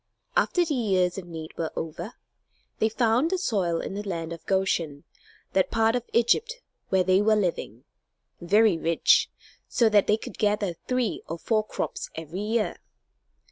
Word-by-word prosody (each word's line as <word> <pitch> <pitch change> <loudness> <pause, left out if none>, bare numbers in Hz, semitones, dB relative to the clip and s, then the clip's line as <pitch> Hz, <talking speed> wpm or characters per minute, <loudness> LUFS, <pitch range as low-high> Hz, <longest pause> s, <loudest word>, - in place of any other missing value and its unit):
After 355 -1 +2
the 310 - -1
years 190 -7 +1
of 180 - -10
need 160 -2 -8
were 160 -1 -1
over, 165 +7 -5 0.7
they 220 - +3
found 235 +6 +2
the 375 - 0
soil 190 - 0
in - - -5
the 205 - -3
land 170 -5 -4
of 165 - -10
Goshen, 170 -7 0 0.5
that 190 - +2
part 225 0 +2
of 245 -1 -3
Egypt 450 - +2 0.3
where 190 -1 +3
they 185 +2 +3
were 215 +1 +4
living, 170 - -2 0.6
very 200 0 +4
rich, 165 0 +3 0.4
so 230 -2 +3
that 210 -2 +4
they 210 - +3
could - - -10
gather 205 -3 +1
three 250 -4 0
or 165 - -3
four 215 +5 0
crops - - -4
every 160 +4 -6
year. 215 +1 -1
200 Hz, 165 wpm, -26 LUFS, 170-225 Hz, 0.7 s, were